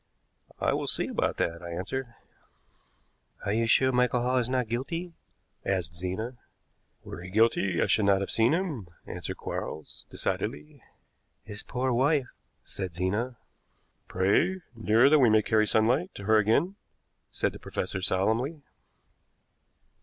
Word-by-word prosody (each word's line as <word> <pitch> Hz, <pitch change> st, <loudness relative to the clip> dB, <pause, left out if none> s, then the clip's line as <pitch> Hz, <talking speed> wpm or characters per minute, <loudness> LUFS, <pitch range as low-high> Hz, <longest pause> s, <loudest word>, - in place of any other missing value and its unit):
"I -, -, +1 dB
will -, -, -2 dB
see -, -, +3 dB
about -, -, -1 dB
that," 85 Hz, +1 st, -1 dB
I 85 Hz, -, -7 dB
answered. 100 Hz, +10 st, -3 dB, 1.4 s
"Are 100 Hz, -, 0 dB
you 115 Hz, +1 st, +1 dB
sure 130 Hz, +3 st, +4 dB
Michael 125 Hz, -1 st, +2 dB
Hall 125 Hz, +1 st, +1 dB
is 120 Hz, 0 st, -1 dB
not 125 Hz, -2 st, 0 dB
guilty?" 165 Hz, +10 st, -3 dB, 0.5 s
asked 90 Hz, -4 st, -1 dB
Zena. 95 Hz, +8 st, -4 dB, 0.7 s
"Were 85 Hz, -, -8 dB
he 90 Hz, -, -8 dB
guilty 100 Hz, -3 st, +2 dB
I -, -, +3 dB
should 110 Hz, -, +2 dB
not 100 Hz, -1 st, +4 dB
have 100 Hz, -, -2 dB
seen 115 Hz, +2 st, +4 dB
him," 160 Hz, -, -1 dB, 0.2 s
answered -, -, -6 dB
Quarles 80 Hz, -, -6 dB
decidedly. 75 Hz, +1 st, -4 dB, 0.6 s
"His 105 Hz, -1 st, -6 dB
poor 130 Hz, 0 st, -1 dB
wife!" 135 Hz, +1 st, +2 dB, 0.3 s
said 95 Hz, -4 st, -6 dB
Zena. 105 Hz, +8 st, -1 dB, 0.7 s
"Pray, 155 Hz, -, +2 dB
dear, 115 Hz, +3 st, +4 dB
that 150 Hz, +1 st, +6 dB
we 125 Hz, -4 st, +6 dB
may 110 Hz, 0 st, +4 dB
carry 110 Hz, 0 st, +2 dB
sunlight 125 Hz, -, +2 dB
to -, -, -8 dB
her 110 Hz, +2 st, +4 dB
again," 140 Hz, -, +2 dB, 0.5 s
said -, -, -1 dB
the -, -, -10 dB
professor 95 Hz, -, -3 dB
solemnly. 115 Hz, -, 0 dB
115 Hz, 145 wpm, -28 LUFS, 95-130 Hz, 1.4 s, that